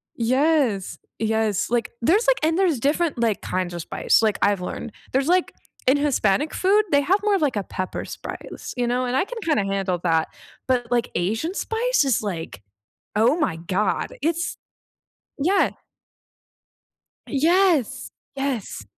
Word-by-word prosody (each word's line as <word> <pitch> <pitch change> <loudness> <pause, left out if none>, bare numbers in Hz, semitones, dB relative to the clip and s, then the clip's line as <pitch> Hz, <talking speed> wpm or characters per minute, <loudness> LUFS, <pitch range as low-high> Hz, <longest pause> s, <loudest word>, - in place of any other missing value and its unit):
Yes. 255 - +1 0.2
Yes. 220 -3 0
Like, 235 -1 0
there's 390 - +3
like - - +4
and 320 +2 +2
there's 350 -10 +2
different, 300 +4 +1
like, 225 -4 +1
kinds 180 -1 -2
of 170 - -4
spice, - - +2
like, 215 -3 +2
I've 200 -2 +2
learned. 195 +5 -5 0.2
There's, 265 +2 +1
like 360 +1 +2 0.3
In 270 +3 +5
Hispanic 285 -1 +1
food, 405 +3 +3
they 285 -1 +5
have 380 +8 +2
more 415 -1 +3
of, 385 - 0
like, 280 -7 +1
a 205 - -1
pepper 185 0 -4
spice, - - -8
you 245 -1 +1
know, 250 +1 0
and 250 +1 -1
I 270 - +2
can - - -8
kind 310 -3 +2
of 195 - 0
handle 195 -2 -1
that, 160 -2 +2 0.4
but, 245 -2 0
like, 240 -1 +1
Asian 220 - -1
spice 475 -1 +1
is 265 -4 +2
like, 165 - -5 0.5
"Oh, 235 +8 +4
my 305 - 0
god." 185 +5 -1
It's 335 +3 -1 0.8
Yeah. 370 +7 +3 1.6
Yes. 310 - +2 0.2
Yes. 270 - -3
260 Hz, 160 wpm, -23 LUFS, 210-325 Hz, 1.6 s, In